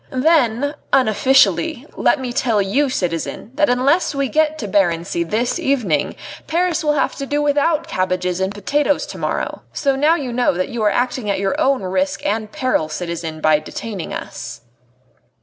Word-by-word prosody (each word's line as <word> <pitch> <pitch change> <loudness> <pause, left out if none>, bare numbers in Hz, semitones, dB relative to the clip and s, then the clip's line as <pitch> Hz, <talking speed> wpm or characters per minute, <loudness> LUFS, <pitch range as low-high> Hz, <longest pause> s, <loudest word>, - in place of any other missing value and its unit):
"Then, 270 -1 +2 0.2
unofficially, 270 +4 +3
let - - +2
me 250 -2 -4
tell 240 -5 +1
you, 225 +9 +1
citizen, 180 0 -3
that 300 +1 +2
unless 275 +6 +2
we 275 -1 0
get 310 0 +1
to 220 - -4
Barency 170 -3 +1
this 220 +8 -1
evening, 215 - 0 0.3
Paris 340 0 0
will 300 -1 +2
have 290 - 0
to 275 - -4
do 290 +1 0
without 295 +2 +1
cabbages 185 - -1
and 190 +1 0
potatoes 280 +8 0
to - - -9
morrow. - - -2
So 275 -2 +1
now 300 +5 +3
you 265 -7 -4
know 245 -3 +2
that 185 +1 -1
you 235 - -4
are 210 - +4
acting 245 +1 -1
at 200 - +1
your 195 0 0
own 270 -5 +2
risk 190 +1 -1
and 215 +1 -1
peril, 255 - 0
citizen, 165 -1 -5
by 155 -1 +4
detaining 195 +4 -6
us." 115 - -7
245 Hz, 170 wpm, -19 LUFS, 190-285 Hz, 0.3 s, are